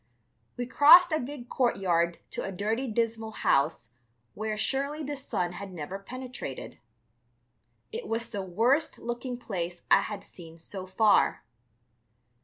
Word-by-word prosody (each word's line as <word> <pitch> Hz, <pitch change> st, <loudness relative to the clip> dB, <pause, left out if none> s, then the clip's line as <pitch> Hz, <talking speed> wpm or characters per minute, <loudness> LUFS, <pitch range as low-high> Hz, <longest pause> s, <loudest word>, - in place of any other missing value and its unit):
We 245 Hz, -, -2 dB
crossed 330 Hz, +7 st, +8 dB
a 310 Hz, -, +2 dB
big 255 Hz, -2 st, -7 dB
courtyard 175 Hz, -10 st, +1 dB
to -, -, -4 dB
a 195 Hz, -, -4 dB
dirty, 220 Hz, +7 st, -1 dB
dismal 225 Hz, -1 st, -1 dB, 0.2 s
house 140 Hz, -3 st, +2 dB, 0.4 s
where 215 Hz, 0 st, -3 dB
surely 280 Hz, +6 st, -1 dB
the 290 Hz, +1 st, -3 dB
sun 185 Hz, -10 st, -2 dB
had 195 Hz, +2 st, -7 dB
never 180 Hz, +3 st, -6 dB
penetrated. 255 Hz, +5 st, -7 dB, 1.1 s
It 460 Hz, 0 st, -5 dB
was 230 Hz, +1 st, -2 dB
the 205 Hz, -, -3 dB
worst 230 Hz, -, +1 dB
looking 240 Hz, +1 st, -4 dB
place 175 Hz, -7 st, -5 dB
I -, -, +7 dB
had 205 Hz, -2 st, -5 dB
seen 165 Hz, -2 st, -12 dB
so 185 Hz, +3 st, -8 dB
far. 205 Hz, +3 st, +3 dB
220 Hz, 135 wpm, -28 LUFS, 185-255 Hz, 1.1 s, crossed